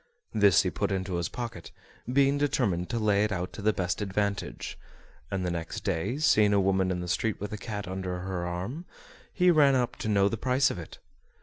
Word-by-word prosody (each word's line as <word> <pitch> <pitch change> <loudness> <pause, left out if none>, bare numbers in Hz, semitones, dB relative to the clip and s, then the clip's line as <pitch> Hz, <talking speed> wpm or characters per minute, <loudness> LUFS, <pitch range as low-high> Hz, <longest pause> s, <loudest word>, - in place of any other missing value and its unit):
This 100 -4 +5
he - - -1
put - - -1
into 95 -2 -2
his 85 - -2
pocket, 115 -8 -6 0.4
being 140 +1 +3
determined 105 -11 0
to 120 - -1
lay 105 -2 +2
it 105 - 0
out 90 -2 -3
to - - -7
the 110 +1 +3
best 90 -1 -2
advantage; 100 0 -2 0.5
and 95 -2 -2
the 90 - -1
next 85 -1 -5
day, 100 +6 -1
seeing 105 -9 +4
a 100 - +4
woman 95 -1 +2
in 90 -1 -1
the 90 - -5
street 100 +4 -1
with 105 +1 -5
a - - -3
cat 105 -2 -5
under 90 -1 -4
her 90 -2 -3
arm, 95 - -4 0.5
he 180 -1 +4
ran 145 -4 +5
up 125 -2 0
to 110 - -3
know 100 -1 +4
the 115 - -2
price 130 +3 +2
of - - -5
it. 80 - -10
100 Hz, 215 wpm, -28 LUFS, 90-115 Hz, 0.5 s, This